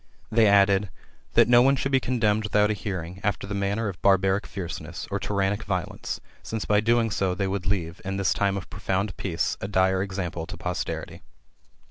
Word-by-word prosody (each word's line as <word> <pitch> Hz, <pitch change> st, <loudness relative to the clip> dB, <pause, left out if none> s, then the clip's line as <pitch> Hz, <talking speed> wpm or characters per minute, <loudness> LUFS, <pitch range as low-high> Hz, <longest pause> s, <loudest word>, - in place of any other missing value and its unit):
They 110 Hz, -1 st, +5 dB
added, 100 Hz, -1 st, +4 dB, 0.2 s
" -, -, -34 dB
That -, -, +6 dB
no 120 Hz, 0 st, +7 dB
one 135 Hz, +2 st, +5 dB
should 135 Hz, +1 st, -2 dB
be 135 Hz, -, +4 dB
condemned 110 Hz, -4 st, +1 dB
without 105 Hz, 0 st, +2 dB
a -, -, +2 dB
hearing, 95 Hz, -3 st, -5 dB
after 105 Hz, 0 st, -1 dB
the 100 Hz, -, -5 dB
manner 100 Hz, +3 st, -1 dB
of 95 Hz, -4 st, -6 dB
Barbaric 95 Hz, 0 st, +3 dB
fierceness, 90 Hz, -3 st, -6 dB
or -, -, -1 dB
tyrannic 100 Hz, +1 st, -1 dB
riolence, 90 Hz, -4 st, -3 dB, 0.2 s
since 110 Hz, -1 st, -4 dB
by 105 Hz, -, +3 dB
so -, -, +1 dB
doing, 115 Hz, 0 st, +2 dB, 0.3 s
they 100 Hz, -, 0 dB
would 95 Hz, 0 st, -3 dB
leave, 85 Hz, -4 st, -2 dB
in 95 Hz, +1 st, -3 dB
this 100 Hz, -1 st, +2 dB
time 100 Hz, -1 st, 0 dB
of 95 Hz, -, -6 dB
profound 95 Hz, 0 st, -2 dB
peace, 85 Hz, -4 st, -2 dB
a -, -, -3 dB
dire 95 Hz, -1 st, +2 dB
example 90 Hz, -4 st, -4 dB
to -, -, -7 dB
posterity." -, -, -4 dB
100 Hz, 195 wpm, -26 LUFS, 95-105 Hz, 0.3 s, no